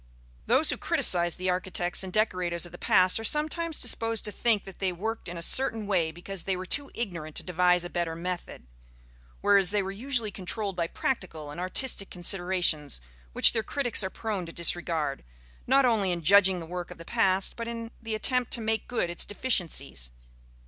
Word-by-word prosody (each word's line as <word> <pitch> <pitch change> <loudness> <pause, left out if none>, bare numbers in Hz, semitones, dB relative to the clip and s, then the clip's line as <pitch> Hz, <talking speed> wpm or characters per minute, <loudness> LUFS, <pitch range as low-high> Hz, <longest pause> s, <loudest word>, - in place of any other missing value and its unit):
Those 270 +6 +4
who - - -2
criticize 180 - +3
the 185 0 -1
architects 180 -1 0
and 190 -1 -5
decorators 180 -5 0
of 175 - -11
the 175 - -11
past 185 +3 +3
are - - -6
sometimes 310 +4 +1
disposed 225 -1 0
to 210 - -1
think 220 -2 +1
that 195 -2 -12
they 190 -2 0
worked 215 +3 -4
in 175 - -6
a 170 - -5
certain 225 0 +1
way 180 -5 +1
because 175 +3 -4
they 190 +1 -2
were 185 - -5
too 285 +8 -1
ignorant 170 -9 -5
to - - -1
devise 180 0 +2
a - - -3
better 170 -2 -2
method; 175 - -5 0.8
whereas 195 -3 +4
they 205 0 +1
were 190 - -4
usually 230 0 -2
controlled 195 +1 -4
by 170 -1 -1
practical 160 - -3
and 150 - -8
artistic 195 +2 0
considerations 175 - +1 0.3
which - - +7
their 225 - +1
critics 245 -2 0
are 190 - -2
prone 200 -4 -4
to - - -7
disregard, 165 -4 -1 0.4
not 270 +2 +5
only 215 -6 +2
in 170 -1 -3
judging 190 +1 +5
the 165 - -7
work 175 +1 -6
of - - -10
the 165 - -11
past, 195 -4 +2
but 230 0 -5
in 230 -1 -6
the 225 -1 -3
attempt 250 +2 0
to - - -3
make 220 0 -1
good 235 -7 -1
its 175 0 +2
deficiencies. 170 - -2
190 Hz, 195 wpm, -28 LUFS, 175-225 Hz, 0.8 s, which